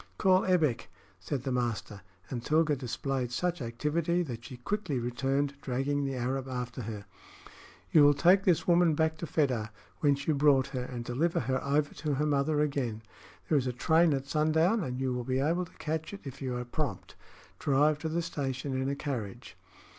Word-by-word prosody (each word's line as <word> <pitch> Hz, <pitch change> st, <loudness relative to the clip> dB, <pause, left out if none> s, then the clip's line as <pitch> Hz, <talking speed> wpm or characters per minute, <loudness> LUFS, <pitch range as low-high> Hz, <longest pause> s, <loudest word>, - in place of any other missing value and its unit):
"Call 190 Hz, -1 st, +4 dB
Ebbek," 155 Hz, -11 st, +2 dB, 0.3 s
said 125 Hz, +7 st, -3 dB
the 135 Hz, -, -2 dB
master; 120 Hz, -5 st, -2 dB, 0.3 s
and 120 Hz, -3 st, -3 dB
Tilga 155 Hz, +1 st, +3 dB
displayed 130 Hz, 0 st, -3 dB
such 175 Hz, +4 st, -1 dB
activity 155 Hz, +9 st, 0 dB
that 120 Hz, -7 st, -6 dB
she 125 Hz, -, -9 dB
quickly 180 Hz, -, -2 dB
returned, 135 Hz, +4 st, -1 dB
dragging 140 Hz, +3 st, -1 dB
the 135 Hz, -1 st, -2 dB
Arab 130 Hz, +2 st, -2 dB
after 125 Hz, -1 st, -4 dB
her. 105 Hz, -2 st, -6 dB, 0.9 s
"You 155 Hz, -, +7 dB
will 145 Hz, 0 st, +6 dB
take 180 Hz, +6 st, +5 dB
this 180 Hz, -5 st, +2 dB
woman 170 Hz, -2 st, +4 dB
back 160 Hz, +1 st, +1 dB
to 170 Hz, -, -4 dB
Fedah, 125 Hz, -9 st, 0 dB, 0.3 s
whence 140 Hz, -2 st, +2 dB
you 155 Hz, -, +3 dB
brought 140 Hz, -2 st, +4 dB
her, 130 Hz, -2 st, -3 dB
and 120 Hz, -2 st, -6 dB
deliver 150 Hz, +8 st, 0 dB
her 130 Hz, +2 st, -1 dB
over 145 Hz, +1 st, +1 dB
to 150 Hz, -2 st, -2 dB
her 150 Hz, +3 st, 0 dB
mother 150 Hz, +1 st, +1 dB
again. 130 Hz, -7 st, -1 dB, 0.4 s
There 150 Hz, -, +3 dB
is 130 Hz, -, -3 dB
a 125 Hz, -, -1 dB
train 160 Hz, +6 st, +3 dB
at 135 Hz, 0 st, -4 dB
sundown, 160 Hz, +8 st, +2 dB
and 125 Hz, -3 st, -4 dB
you 130 Hz, -1 st, 0 dB
will 125 Hz, 0 st, -2 dB
be 130 Hz, +2 st, -1 dB
able 165 Hz, +6 st, +1 dB
to -, -, -19 dB
catch 160 Hz, +4 st, -3 dB
it 200 Hz, -, -12 dB
if 135 Hz, 0 st, -9 dB
you 125 Hz, -2 st, -2 dB
are 125 Hz, -, -4 dB
prompt. 120 Hz, -, -4 dB, 0.5 s
Drive 145 Hz, +2 st, +3 dB
to 160 Hz, -, -3 dB
the 170 Hz, +2 st, -1 dB
station 135 Hz, -4 st, -3 dB
in 135 Hz, -, -1 dB
a 140 Hz, -, -1 dB
carriage." 125 Hz, -9 st, -5 dB
140 Hz, 190 wpm, -30 LUFS, 125-155 Hz, 0.9 s, You